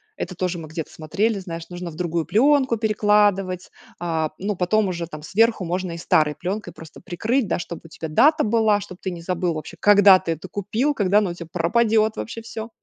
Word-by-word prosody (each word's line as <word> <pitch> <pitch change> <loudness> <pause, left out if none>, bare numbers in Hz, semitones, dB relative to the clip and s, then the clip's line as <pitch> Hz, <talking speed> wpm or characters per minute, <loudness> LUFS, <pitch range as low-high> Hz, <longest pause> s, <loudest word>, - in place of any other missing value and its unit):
это 185 - -5
тоже 180 -1 -2
мы 160 - -8
где-то 155 0 -6
смотрели, 200 +7 -1
знаешь, 165 -2 -7
нужно 175 -1 -6
в - - -12
другую 170 -1 -2
пленку 265 0 +3
перекладывать, 205 -4 +1 0.3
а, 160 -2 -1
ну, 200 +1 -2
потом 200 +4 +1
уже, 170 -2 -4
там, 155 -2 -9
сверху 220 +2 +2
можно 180 +1 -2
и - - -6
старой 155 -2 +2
пленкой 180 +3 -4
просто 160 -1 -13
прикрыть, 220 +8 -1
да, - - 0
чтобы 170 0 -7
у - - -10
тебя 160 0 -7
дата 300 - +4
была, 215 -1 +2
чтобы 185 -2 -10
ты 190 - -3
не 170 -1 -7
забыл 180 -1 -1
вообще 155 - -7
когда 205 -2 +7
ты 165 - -2
это 165 +4 -9
купил, 215 +10 -1
когда 205 -4 +2
оно 200 -4 +2
у - - -5
тебя 170 -1 -9
пропадет 220 +5 +2
вообще 230 0 -6
всё. 225 0 -7
185 Hz, 210 wpm, -22 LUFS, 170-215 Hz, 0.3 s, когда